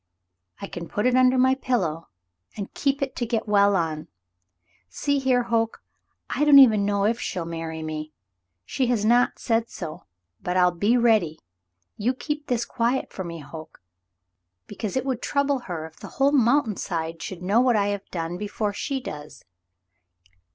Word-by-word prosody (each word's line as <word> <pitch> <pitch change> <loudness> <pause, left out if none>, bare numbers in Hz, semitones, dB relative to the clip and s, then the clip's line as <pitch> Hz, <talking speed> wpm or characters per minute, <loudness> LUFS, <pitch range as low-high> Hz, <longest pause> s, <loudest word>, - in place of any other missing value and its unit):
"I - - -5
can 170 -3 -7
put 210 +6 -2
it 250 - +3
under 255 0 +4
my 260 +1 +4
pillow 190 - -1 0.5
and 200 -2 -6
keep 275 0 0
it 270 - -4
to 245 - -1
get 225 -2 -1
well 200 -1 +4
on. 160 -3 -2 0.8
See 285 - 0
here, 255 -2 +2
Hoke. 225 -1 -1 0.4
I 295 - -1
don't 295 -1 +7
even 220 -7 +7
know 200 -1 +1
if 230 +3 +1
she'll 175 -2 -3
marry 165 -1 -5
me; 155 0 -5 0.5
she 260 - -1
has 230 -4 +1
not 240 +2 +3
said 230 -1 0
so, 160 -4 -7 0.4
but 180 +1 -1
I'll 180 -1 +5
be 205 +8 +2
ready. 215 -10 +3 0.6
You'll 240 +5 0
keep 295 +2 -4
this 240 -2 0
quiet 245 +2 -1
for 190 - -5
me, 170 -2 -7
Hoke? 155 +3 -11 0.9
Because 215 +1 -4
it 260 - -1
would 255 -3 -2
trouble 280 -1 +1
her 160 -3 -4
if 160 0 -13
the - - -8
whole 275 +1 +4
mountain 245 -4 +3
side 165 -2 -4
should 180 -2 -6
know 205 +6 +3
what 250 -2 +3
I 205 -1 +2
have 200 -1 -4
done 170 0 -4
before 210 0 -2
she 270 +6 -3
does. 150 - -9
215 Hz, 175 wpm, -24 LUFS, 170-255 Hz, 0.9 s, don't